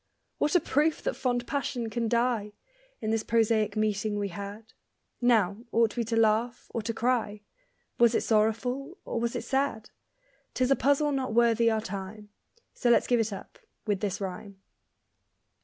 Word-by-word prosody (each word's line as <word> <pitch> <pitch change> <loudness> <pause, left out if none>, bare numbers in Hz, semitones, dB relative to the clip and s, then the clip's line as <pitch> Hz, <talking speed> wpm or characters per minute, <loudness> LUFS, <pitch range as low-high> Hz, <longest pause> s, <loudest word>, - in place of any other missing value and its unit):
What 300 - +1
a - - +7
proof 305 +1 +1
that - - -1
fond 245 -1 -1
passion 265 -4 -2
can 230 +1 -1
die, 235 -3 0 0.5
In 215 - -1
this 225 0 +1
prosaic 220 -3 +1
meeting 215 -1 0
we 200 -1 -2
had! 200 +4 -8 0.5
Now, 215 -6 +3
ought 230 -1 +2
we 240 - 0
to 225 +1 -2
laugh 225 +2 +2
or 230 - -1
to 230 +2 -2
cry 225 -3 -1 0.6
Was 235 -1 +5
it - - +2
sorrowful, 245 - 0
or - - -2
was 235 0 -1
it - - -3
sad? 265 -5 -1 0.6
'Tis 255 +1 +1
a - - +6
puzzle 285 +2 +2
not 260 -5 -2
worthy 235 -1 +4
our 220 -1 0
time, 205 +1 -7 0.4
So 245 - 0
let's 240 - +5
give 245 -1 +2
it 225 -1 0
up 195 - -9 0.3
with 205 -3 0
this 200 -2 -2
rhyme. 195 0 -6
225 Hz, 170 wpm, -28 LUFS, 210-245 Hz, 0.6 s, a